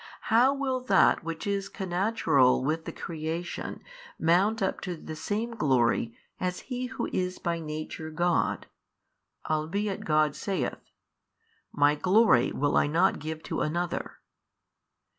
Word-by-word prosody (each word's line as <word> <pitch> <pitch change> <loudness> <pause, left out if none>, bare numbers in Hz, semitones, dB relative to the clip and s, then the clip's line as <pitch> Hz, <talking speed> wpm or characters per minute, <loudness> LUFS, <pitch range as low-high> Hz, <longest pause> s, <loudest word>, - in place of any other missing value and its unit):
how 245 +4 +6
will 275 -2 -1
that 200 -9 +3
which 165 0 -5
is 200 -1 -1
connatural 175 - +2
with 160 +3 -1
the - - -4
creation 165 +2 -5 0.3
mount 190 +7 +3
up 190 -3 -1
to 180 -3 -4
the 155 0 -8
same 210 +9 -2
glory 120 - +1 0.2
as 180 0 -2
He 250 -1 -4
Who 260 -1 -4
is 185 0 -1
by 170 -1 -2
Nature 155 0 -6
God, 175 +2 0 0.8
albeit 185 +6 -1
God 155 -1 +2
saith, 195 -3 -3 0.9
My 145 0 +4
Glory 185 - +4
will 145 +1 0
I - - +3
not 160 +4 +2
give 160 +1 -6
to - - -3
another? 175 +3 -2
175 Hz, 130 wpm, -28 LUFS, 155-200 Hz, 0.9 s, how